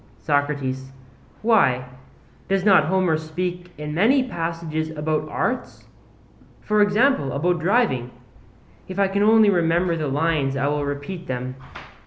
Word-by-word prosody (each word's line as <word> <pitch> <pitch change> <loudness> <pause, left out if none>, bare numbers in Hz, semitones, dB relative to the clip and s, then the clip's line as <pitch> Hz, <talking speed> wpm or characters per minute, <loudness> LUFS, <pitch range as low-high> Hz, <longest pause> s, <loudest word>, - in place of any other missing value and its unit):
SOCRATES: 145 -3 -1 0.5
Why, 140 - +3 0.6
does 195 0 +1
not 190 -7 +6
Homer 180 -2 +1
speak 175 +3 -5
in 150 0 -5
many 240 - +3
passages 165 -4 -3
about 155 0 -2
arts? 250 +10 -3 0.8
For 210 0 +1
example, 205 - +2
about 175 +5 0
driving; 170 - +1 0.8
if 185 - -7
I 200 -1 +3
can 200 +1 -1
only 215 0 +5
remember 170 0 +1
the 155 -2 -2
lines 145 -1 0
I 135 - 0
will 145 0 -1
repeat 145 +5 -5
them. 130 0 -4
165 Hz, 130 wpm, -22 LUFS, 145-195 Hz, 0.8 s, not